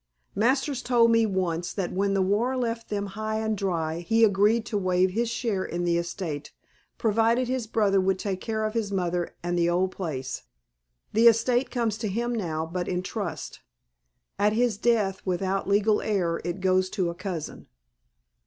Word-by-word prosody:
Masters 260 +4 +1
told 235 -2 +4
me 230 -1 +4
once 180 -3 -1
that 190 -4 -2
when 195 +1 +1
the 195 - +3
war 225 +7 +1
left 230 -2 -2
them 205 -1 -2
high 215 +1 -2
and 220 0 -1
dry 170 -5 -1
he 225 +6 +2
agreed 215 +2 +4
to 220 - -5
waive 185 0 +2
his 230 +4 0
share 225 -5 -1
in 175 +2 -3
the 170 -1 +2
estate 170 -4 -4 0.5
provided 230 +3 +2
his 255 -3 -2
brother 200 -3 +2
would 190 0 +1
take 190 -1 -3
care 220 -1 -2
of 215 - -2
his 220 -3 -1
mother 180 -2 -1
and 175 0 0
the 170 0 +3
old 185 +2 +1
place. 135 -9 -4 0.7
The 225 +2 +6
estate 240 +3 +3
comes 230 -4 -1
to 220 - -2
him 235 +4 -1
now, 165 -8 -2
but 175 +2 -4
in 180 0 -1
trust. 195 -3 -5 0.8
At 210 +1 +3
his 235 -1 +2
death, 205 -3 +1
without 190 +1 -1
legal 210 +1 +3
heir, 180 -6 0
it 175 +2 -4
goes 185 0 +2
to 185 -4 -1
a - - -7
cousin." 170 -3 -6
200 Hz, 180 wpm, -26 LUFS, 180-225 Hz, 0.8 s, The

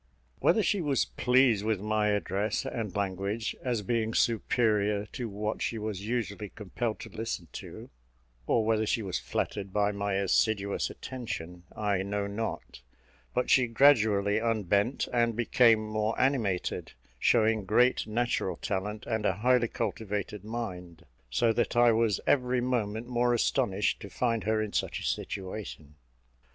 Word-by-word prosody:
Whether 220 - +3
she 200 -1 +1
was 145 -5 +1
pleased 125 -4 +3
with 110 -2 0
my 105 +1 0
address 105 0 -1
and 110 -5 -4
language, 100 +3 -2
as 120 -5 -1
being 115 +1 -1
superior 105 -3 +2
to 120 -4 -4
what 105 +2 -3
she 115 - -1
was 105 -2 -4
usually 105 -4 -2
compelled 110 +3 -4
to 110 - -8
listen 110 -6 -5
to, - - -9 0.6
or 115 -2 +2
whether 110 -1 +1
she 115 - 0
was 95 -2 -2
flattered 100 -2 -3
by 105 +1 +2
my 100 0 -2
assiduous 100 +1 +1
attention, 90 -9 -7
I 100 -3 0
know 100 +1 -2
not; 105 +3 -5 0.5
but 125 - +1
she 130 -2 +5
gradually 110 -5 +4
unbent, 110 +1 +1
and 120 -2 +2
became 115 -2 +4
more 110 +1 -1
animated; 115 -9 0 0.3
showing 110 -3 +3
great 120 +4 +3
natural 120 +3 -1
talent 105 +1 -3
and 110 -2 -1
a 95 - +2
highly 120 +3 +3
cultivated 105 -2 -3
mind; 90 -7 -6 0.2
so 115 - +2
that 115 -1 0
I 120 0 +6
was 110 -3 +2
every 125 -2 +2
moment 115 -3 -1
more 120 0 +1
astonished 100 -3 +1
to 100 - -9
find 115 +1 -1
her 110 0 +1
in 105 - -6
such - - -1
a - - -8
situation. 95 -6 -5
110 Hz, 145 wpm, -29 LUFS, 100-120 Hz, 0.6 s, I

